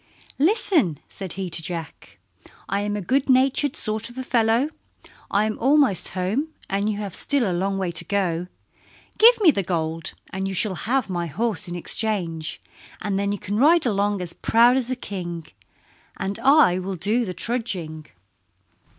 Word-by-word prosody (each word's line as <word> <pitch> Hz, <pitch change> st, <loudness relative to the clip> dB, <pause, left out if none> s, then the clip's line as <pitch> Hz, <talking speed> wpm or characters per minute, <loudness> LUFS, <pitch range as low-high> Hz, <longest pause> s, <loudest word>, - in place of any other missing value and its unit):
"Listen," 310 Hz, -, +2 dB
said 190 Hz, -3 st, -7 dB
he 190 Hz, -1 st, -4 dB
to 165 Hz, -, +1 dB
Jack, 165 Hz, -1 st, -6 dB, 0.5 s
"I 200 Hz, -, -1 dB
am 205 Hz, 0 st, -2 dB
a 205 Hz, -, -3 dB
good 270 Hz, +8 st, 0 dB
natured 265 Hz, +2 st, +3 dB
sort 215 Hz, +1 st, -2 dB
of 240 Hz, -, -14 dB
a 260 Hz, -, -3 dB
fellow. 235 Hz, +3 st, +2 dB, 0.6 s
I 205 Hz, +2 st, +2 dB
am 215 Hz, 0 st, -3 dB
almost 270 Hz, -, +3 dB
home 205 Hz, +12 st, 0 dB, 0.2 s
and 200 Hz, +2 st, -1 dB
you 210 Hz, -, -2 dB
have 205 Hz, -3 st, -5 dB
still 275 Hz, -6 st, 0 dB
a 185 Hz, -, -1 dB
long 195 Hz, +3 st, -1 dB
way 185 Hz, -2 st, -1 dB
to 170 Hz, 0 st, +1 dB
go. 180 Hz, -3 st, -1 dB, 0.7 s
Give 470 Hz, +2 st, +7 dB
me 350 Hz, -6 st, +7 dB
the 200 Hz, -, -1 dB
gold 165 Hz, -2 st, -3 dB, 0.2 s
and 190 Hz, 0 st, -2 dB
you 195 Hz, -, -4 dB
shall 200 Hz, +2 st, +1 dB, 0.2 s
have 265 Hz, 0 st, +1 dB
my 175 Hz, -3 st, -3 dB
horse 210 Hz, +4 st, -2 dB
in 175 Hz, -, -5 dB
exchange, 175 Hz, -4 st, -2 dB, 0.4 s
and 200 Hz, -2 st, -2 dB
then 200 Hz, 0 st, 0 dB
you 205 Hz, -, -2 dB
can 205 Hz, +1 st, -4 dB
ride 320 Hz, +4 st, +5 dB
along 205 Hz, -3 st, 0 dB
as 170 Hz, -1 st, -7 dB
proud 235 Hz, +2 st, +4 dB
as 255 Hz, -2 st, +1 dB
a 255 Hz, -, 0 dB
king, 175 Hz, -8 st, -6 dB, 0.7 s
and 195 Hz, +1 st, -3 dB
I 270 Hz, -, +5 dB
will 190 Hz, +1 st, -4 dB
do 215 Hz, +8 st, +1 dB
the 185 Hz, -5 st, -5 dB
trudging." 180 Hz, -11 st, -2 dB
200 Hz, 175 wpm, -23 LUFS, 180-245 Hz, 0.7 s, Give